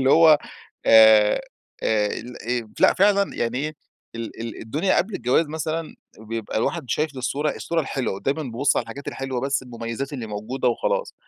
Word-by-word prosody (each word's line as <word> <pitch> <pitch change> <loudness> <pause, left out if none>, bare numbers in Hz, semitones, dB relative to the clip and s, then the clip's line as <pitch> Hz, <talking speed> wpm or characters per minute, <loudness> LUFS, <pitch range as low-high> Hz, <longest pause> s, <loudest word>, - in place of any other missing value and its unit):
اللي 130 0 +3
هو 160 0 +7 0.5
آآ، 110 -1 +7 0.4
آآ 105 -1 +2
الإيه 120 +1 -4
لأ - - +6
فعلًا 200 0 +3
يعني 120 +2 -1
إيه، 155 +2 -3 0.4
ال 115 -1 -7
ال 115 -1 -6
الدنيا 150 - 0
قبل 200 +3 0
الجواز 130 +4 +2
مثلًا 160 +1 -3 0.2
بيبقى 110 0 -5
الواحد 110 - -1
شايف 150 -2 -1
الصورة 140 +4 -1
الصورة 170 -1 -1
الحلوة، 130 -8 -3
دايمًا 145 +4 -1
بابص 130 +1 0
على - - +2
الحاجات 120 +5 -8
الحلوة 135 -2 -3
بس 135 0 0
المميزات 120 +2 -5
اللي 125 -5 -5
موجودة 110 +5 -2
وخلاص. 120 - -1
130 Hz, 165 wpm, -23 LUFS, 115-150 Hz, 0.5 s, هو